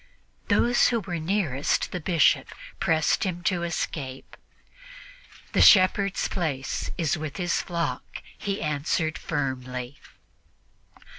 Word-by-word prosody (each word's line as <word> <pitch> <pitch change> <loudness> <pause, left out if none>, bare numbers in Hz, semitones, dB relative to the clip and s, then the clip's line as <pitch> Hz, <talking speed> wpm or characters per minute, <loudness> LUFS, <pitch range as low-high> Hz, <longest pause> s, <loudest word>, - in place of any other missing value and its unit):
Those 240 0 +4
who 235 - +1
were 175 -4 -4
nearest 160 -6 0
the 180 - -3
Bishop 170 -1 +3 0.3
pressed 160 +3 +2
him 175 -3 -3
to 180 -1 +1
escape. 140 -6 -4 1.2
"The - - +2
shepherd's 195 0 +5
place 150 -8 -3
is 160 -2 0
with 155 -2 -5
his 175 -2 0
flock," 170 -7 -4
he 200 0 -3
answered 155 +2 -1
firmly. 130 -3 -4
165 Hz, 105 wpm, -26 LUFS, 140-185 Hz, 1.2 s, shepherd's